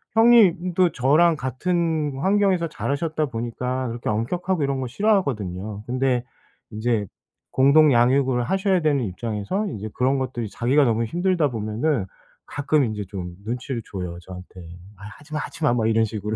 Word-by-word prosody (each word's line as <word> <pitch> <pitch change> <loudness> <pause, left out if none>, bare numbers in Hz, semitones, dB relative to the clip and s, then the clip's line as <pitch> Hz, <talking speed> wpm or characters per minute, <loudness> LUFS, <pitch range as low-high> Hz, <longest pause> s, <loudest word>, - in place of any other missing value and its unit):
형님도 185 -7 +5
저랑 155 +6 +4
같은 155 +3 -1
환경에서 190 0 +2
자라셨다 150 +1 -2
보니까 125 +2 -3
그렇게 120 +1 -6
엄격하고 165 - -1
이런 140 -1 -1
거 130 - -3
싫어하거든요. 110 - -1
근데 125 -1 0 0.5
이제 110 -1 -1 0.5
공동 145 +3 +5
양육을 125 +1 +3
하셔야 190 +4 +1
되는 145 -5 +1
입장에서 110 - -3
이제 110 - -6
그런 135 +2 +1
것들이 120 -4 -3
자기가 135 +7 +2
너무 115 -1 +1
힘들다 175 +2 +1
보면은 110 +3 -1 0.4
가끔 145 +1 +1
인제 105 -3 -4
좀 90 -3 -6
눈치를 125 +1 -4
줘요 90 -3 -5
저한테. 90 +1 -11 0.4
"아이 100 +2 -10
하지 150 +2 -14
마. 150 - -1
하지 155 - -7
마." 145 - +4
뭐 110 -2 +1
이런 115 0 +3
식으로. 105 0 -4
130 Hz, 355 characters per minute, -23 LUFS, 110-160 Hz, 0.5 s, 형님도